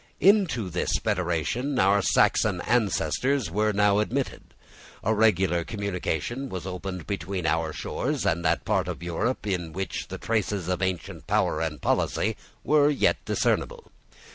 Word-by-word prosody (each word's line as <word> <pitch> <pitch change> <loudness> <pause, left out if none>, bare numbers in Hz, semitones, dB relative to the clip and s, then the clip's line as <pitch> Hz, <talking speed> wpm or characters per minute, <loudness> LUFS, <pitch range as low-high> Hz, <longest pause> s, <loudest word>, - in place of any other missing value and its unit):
Into 180 - +3
this - - -1
federation 90 - -1
our 100 0 +4
Saxon 95 0 +3
ancestors 120 +1 +1
were 105 +3 +1
now 105 0 +3
admitted. 130 +5 -3 0.5
A 110 - +2
regular 95 -5 +3
communication 100 - -3
was 95 -4 -5
opened 90 -1 -5
between 95 -2 -3
our 80 0 +1
shores 135 - -3
and 85 -3 +1
that 80 - +1
part - - +1
of - - -5
Europe 90 +9 -2
in 90 -5 -2
which 95 +3 -4
the - - -6
traces 105 -5 -1
of 90 -2 -1
ancient 95 -3 -3
power - - +1
and 80 -2 -3
policy - - +1 0.3
were 150 -1 +4
yet 145 - +1
discernible. 485 -1 -1
100 Hz, 140 wpm, -26 LUFS, 85-120 Hz, 0.5 s, our